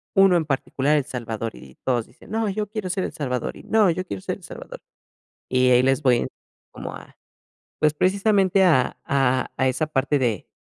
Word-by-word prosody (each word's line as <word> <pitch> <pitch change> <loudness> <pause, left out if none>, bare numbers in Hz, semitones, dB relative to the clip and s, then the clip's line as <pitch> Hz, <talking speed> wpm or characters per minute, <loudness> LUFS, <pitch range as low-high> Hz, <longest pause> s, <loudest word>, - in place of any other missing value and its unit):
uno 195 -2 +6
en 165 - -1
particular 140 +1 0
el 145 - 0
salvador, 115 -5 -4
y 65 - -14
todos 120 -3 0
dicen: - - -17
"No, 220 -1 0
yo 210 +2 -2
quiero 210 -2 -4
ser 185 +1 -1
el - - -4
salvador, 125 -4 -3
y - - -13
no, 215 -3 +3
yo 185 +2 -3
quiero 100 - -6
ser - - -3
el - - -22
salvador". - - -10 0.7
Y 130 0 +3
ahí 125 0 +6
les 135 +1 +2
voy 125 -3 +5
en - - -1 0.4
como - - -7
a - - -14 0.6
pues, 150 -1 +3
precisamente 195 +2 +3
a 155 -8 +3
a 130 -2 +1
a 130 - +2
esa 130 +5 0
parte 145 0 +1
de 115 -8 -1
145 Hz, 205 wpm, -23 LUFS, 125-190 Hz, 0.7 s, uno